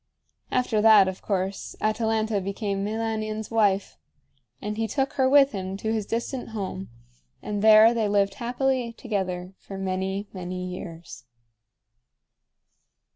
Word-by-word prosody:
After 250 Hz, -4 st, +1 dB
that, 215 Hz, -3 st, +7 dB
of 190 Hz, 0 st, -4 dB
course, 195 Hz, -1 st, -3 dB
Atalanta 220 Hz, -1 st, 0 dB
became 195 Hz, 0 st, -3 dB
Meilanion's 215 Hz, 0 st, -3 dB
wife. 205 Hz, -3 st, +1 dB, 0.6 s
And 210 Hz, +1 st, -4 dB
he 225 Hz, 0 st, -1 dB
took 270 Hz, +5 st, -1 dB
her 260 Hz, -2 st, +2 dB
with 280 Hz, 0 st, +6 dB
him 190 Hz, -1 st, -4 dB
to 220 Hz, +2 st, -2 dB
his 215 Hz, -2 st, -2 dB
distant 235 Hz, +2 st, -3 dB
home, 190 Hz, -1 st, -5 dB, 0.5 s
and 205 Hz, -1 st, -3 dB
there 220 Hz, +1 st, +7 dB
they 225 Hz, -3 st, 0 dB
lived 200 Hz, -1 st, +2 dB
happily 245 Hz, 0 st, -1 dB
together 190 Hz, -6 st, -3 dB
for 195 Hz, -, -9 dB
many, 190 Hz, +1 st, -2 dB
many 180 Hz, -1 st, -5 dB
years. 170 Hz, -6 st, -8 dB
210 Hz, 130 wpm, -25 LUFS, 195-225 Hz, 0.6 s, that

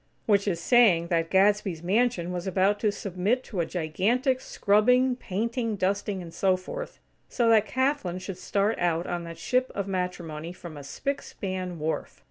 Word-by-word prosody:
Which 205 Hz, -1 st, +3 dB
is 175 Hz, -4 st, 0 dB
saying 175 Hz, -5 st, +4 dB
that 165 Hz, -1 st, +1 dB
Gadsby's 195 Hz, -3 st, +2 dB
mansion 190 Hz, -2 st, +1 dB
was 180 Hz, +1 st, -4 dB
about 195 Hz, +2 st, +2 dB
to 215 Hz, -, +2 dB
submit 200 Hz, +6 st, -1 dB
to 200 Hz, -, -6 dB
a 170 Hz, -, 0 dB
gigantic 215 Hz, -, 0 dB
scrubbing, 250 Hz, +6 st, +3 dB
painting, 230 Hz, +1 st, -2 dB
dusting, 195 Hz, 0 st, -1 dB
and 165 Hz, -1 st, -10 dB
so 190 Hz, -1 st, +2 dB
forth, -, -, -7 dB, 0.3 s
so 235 Hz, -2 st, +2 dB
that 220 Hz, -1 st, +5 dB
Kathlyn 260 Hz, -9 st, 0 dB
should 185 Hz, 0 st, -7 dB
start 205 Hz, +4 st, 0 dB
out 170 Hz, -1 st, +1 dB
on 175 Hz, -1 st, -3 dB
that 165 Hz, 0 st, -8 dB
ship 255 Hz, 0 st, 0 dB
of 200 Hz, -1 st, -2 dB
matrimony 175 Hz, -4 st, -4 dB
from 175 Hz, -3 st, -10 dB
a -, -, -8 dB
spic 275 Hz, -, -3 dB
span 185 Hz, -2 st, -5 dB
wharf. 155 Hz, +1 st, -3 dB
195 Hz, 170 wpm, -27 LUFS, 175-225 Hz, 0.3 s, that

